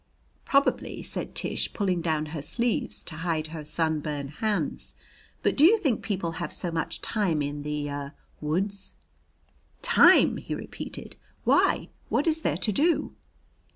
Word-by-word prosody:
"Probably," 275 0 +1
said - - -4
Tish, - - +2
pulling 185 -4 0
down 160 -2 0
her 155 - -3
sleeves 235 - -1
to 160 - -6
hide 165 -2 -1
her 155 -2 -5
sunburned 150 -2 -1
hands. 210 +6 -2 0.5
"But - - +2
do 285 - +4
you 400 +8 +8
think 285 - 0
people 185 -5 -2
have 165 -1 -4
so 175 - -3
much 165 -1 -2
time 180 -9 0
in 145 +1 -4
the 150 0 -3
er 140 0 -5 0.3
woods?" 190 +6 -2 0.9
"Time!" 475 -1 +6
he - - -4
repeated. - - -7 0.3
"Why, - - +3 0.2
what 290 - +1
is 320 -1 +1
there - - 0
to 215 - +1
do?" 320 - +2
170 Hz, 150 wpm, -27 LUFS, 150-215 Hz, 0.9 s, you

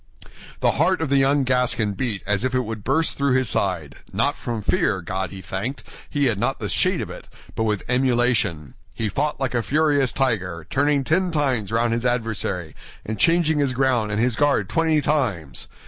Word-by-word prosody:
The - - +4
heart 185 0 +3
of 160 -3 -2
the 140 - +3
young 135 +1 +3
Gascon 125 -5 +1
beat 110 -3 -3
as 105 +2 +1
if 130 0 0
it 130 - +3
would 110 -2 -6
burst 155 +5 +1
through 140 -2 +2
his 130 -3 +1
side—not 85 -7 -1
from 115 -3 -4
fear, 100 0 +1
God 95 +1 -3
be 95 +2 -9
thanked, 110 +8 -4 0.3
he 145 -1 0
had 115 -6 +1
not 130 +4 0
the - - -4
shade - - +1
of - - -5
it, - - -10 0.3
but 110 - 0
with 105 -3 -1
emulation; 120 - +1 0.2
he 110 -1 -1
fought 145 +9 -1
like 135 -3 -1
a 120 - +1
furious 145 -1 +2
tiger, 90 - -1
turning 145 0 +2
ten 180 +7 +1
times 135 - 0
round 115 +1 +1
his 115 +1 -1
adversary, 115 -9 -2 0.3
and 110 0 -4
changing 165 -2 +3
his 140 -3 +1
ground 125 -5 +1
and 105 - -1
his 120 0 +1
guard 145 +2 +2
twenty 160 -2 +2
times. 110 - -1
125 Hz, 195 wpm, -23 LUFS, 105-140 Hz, 0.3 s, The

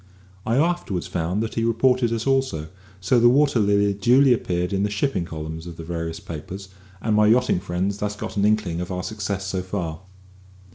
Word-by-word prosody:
I 115 - +2
afterwards 150 - 0
found 90 +5 -1
that 115 - -4
he 115 - -1
reported 120 +1 +2
us 115 -1 -2
also, 130 - 0 0.3
so 95 +7 +2
that - - +4
the 120 - +7
Water 140 -1 +3
Lily 100 -1 +3
duly 125 +6 +5
appeared 90 -5 -1
in 95 - +1
the 105 - +1
"shipping" 100 -3 -1
columns 80 +1 -6
of 85 -1 -9
the 80 - -7
various 80 -1 -4
papers, 95 +5 -8 0.3
and 110 -2 +1
my 105 0 +5
yachting 120 -3 +3
friends 95 +2 -2
thus 105 0 -2
got - - -6
an 100 - +1
inkling 105 -5 +1
of 90 - -5
our 90 0 -3
success 100 -3 -3
so 95 0 -2
far. 90 -4 -4
100 Hz, 200 wpm, -23 LUFS, 90-115 Hz, 0.3 s, the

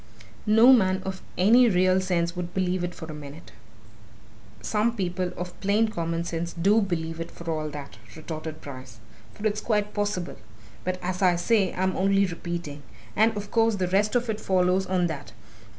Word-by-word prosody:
No 225 +5 +7
man 190 -5 +3
of 190 0 -5 0.2
any 235 +6 +6
real 185 -1 +3
sense 175 -2 0
would 175 0 -5
believe 185 -1 0
it 175 0 -4
for 160 - -8
a 160 - -8
minute!" 150 +2 -10 1.1
"Some 225 +2 0
people 180 -3 -2
of 180 0 -6
plain 210 +3 +2
common 165 -3 -2
sense 170 0 -4
do 200 +6 +3
believe 165 -4 -3
it 165 0 -5
for 170 -1 -6
all 155 -1 -2
that!" 140 -7 -9 0.2
retorted 155 0 -7
Bryce. 130 -4 -10 0.4
"For 210 - -7
it's 215 0 0
quite 210 -2 0
possible. 205 -4 -2 0.5
But 185 0 -2
as 185 +1 -3
I 180 -2 +4
say, 195 +2 +2
I'm 185 0 0
only 195 +1 +3
repeating. 170 -4 -5 0.3
And 220 0 +3
of 205 0 -6
course, 225 -1 +3
the 185 -2 -1
rest 205 +4 +2
of 245 0 +1
it 215 -1 -3
follows 185 0 +2
on 180 -1 +1
that. 150 -4 -5
185 Hz, 180 wpm, -26 LUFS, 170-205 Hz, 1.1 s, No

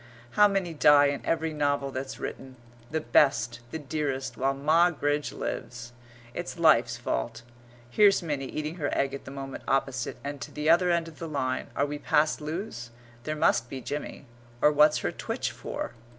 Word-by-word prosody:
How 210 0 +6
many 195 -4 -1
die 145 -1 +6
in 140 -1 -4
every 160 -1 0
novel 145 -2 0
that's 130 0 -5
written 130 -1 -6 0.3
the 160 +1 -1
best, 120 -6 +3
the 160 - -4
dearest, 135 -4 -3
while 135 +3 0
Moggridge 150 0 +2
lives. 120 0 -6 0.4
It's 175 +4 -5
life's 125 -8 +4
fault. 120 -1 -3 0.4
Here's 200 - +4
Minnie 145 -5 -3
eating 155 +4 -4
her 145 -4 -1
egg 135 0 +1
at 140 - -7
the - - -8
moment 135 0 -7
opposite 135 -2 -1
and 145 0 -4
at - - -11
t'other 165 +4 +3
end 170 -1 +1
of 160 - -12
the 165 - -5
line 130 -3 -2
are - - +2
we 145 0 -5
past 150 +1 +2
Lewes? 150 - -5 0.4
there 155 - -2
must 120 -5 +2
be 135 - -5
Jimmy 145 +2 -6 0.3
or 150 - +5
what's 150 +1 +5
her - - +1
twitch - - -3
for? - - -6
145 Hz, 175 wpm, -28 LUFS, 135-155 Hz, 0.4 s, How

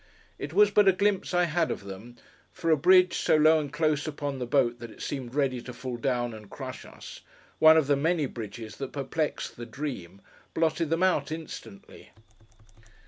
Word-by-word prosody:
It 140 - -5
was 205 +4 +5
but 205 -1 +4
a 195 - +7
glimpse 200 +1 0
I 180 -1 +3
had 170 -1 0
of - - -4
them; 100 +5 -10 0.4
for 165 -1 -1
a - - +6
bridge, 180 +4 +5
so - - +3
low 155 +1 +5
and 145 -2 -5
close 155 -3 0
upon 145 -2 -4
the 125 - -4
boat 120 -2 +1
that 120 0 -8
it - - -15
seemed 130 -2 -5
ready 135 -4 0
to 125 - -9
fall 125 0 -6
down 120 -1 -1
and 105 -2 -11
crush - - -8
us: - - -11 0.4
one 160 0 +8
of 155 - +3
the 145 +1 +3
many 160 +2 +1
bridges 110 -2 -8
that 135 -1 -6
perplexed 145 +2 -3
the 120 - -7
Dream: 110 - -6 0.4
blotted 160 0 +1
them 165 +3 +1
out, 155 -6 +1
instantly. 165 +5 -9
145 Hz, 195 wpm, -27 LUFS, 120-165 Hz, 0.4 s, one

